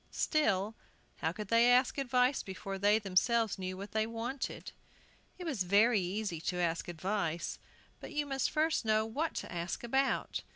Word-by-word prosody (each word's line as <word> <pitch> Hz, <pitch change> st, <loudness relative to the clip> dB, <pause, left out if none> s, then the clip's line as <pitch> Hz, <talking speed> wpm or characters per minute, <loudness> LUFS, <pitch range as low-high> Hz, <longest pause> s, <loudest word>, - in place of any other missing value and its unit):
Still, 215 Hz, -9 st, +1 dB, 0.4 s
how 160 Hz, -, -1 dB
could 205 Hz, +3 st, -7 dB
they 230 Hz, +1 st, +5 dB
ask 255 Hz, +3 st, +3 dB
advice 255 Hz, 0 st, +2 dB
before 195 Hz, 0 st, -6 dB
they 205 Hz, +2 st, +4 dB
themselves 220 Hz, +2 st, +1 dB
knew 185 Hz, 0 st, -4 dB
what 200 Hz, +2 st, -7 dB
they 220 Hz, 0 st, 0 dB
wanted? 230 Hz, +4 st, -4 dB, 0.7 s
It 360 Hz, -, -7 dB
was 280 Hz, -, -2 dB
very 205 Hz, +5 st, +4 dB
easy 185 Hz, -2 st, -3 dB
to 180 Hz, +2 st, -2 dB
ask 170 Hz, -1 st, 0 dB
advice, 175 Hz, -1 st, -2 dB, 0.4 s
but -, -, -9 dB
you 295 Hz, -1 st, -1 dB
must 270 Hz, -2 st, 0 dB
first 315 Hz, -1 st, +1 dB
know 220 Hz, -1 st, +2 dB
what 295 Hz, +9 st, -2 dB
to -, -, -5 dB
ask 175 Hz, +4 st, -4 dB
about. 265 Hz, +3 st, 0 dB
220 Hz, 165 wpm, -33 LUFS, 185-250 Hz, 0.7 s, they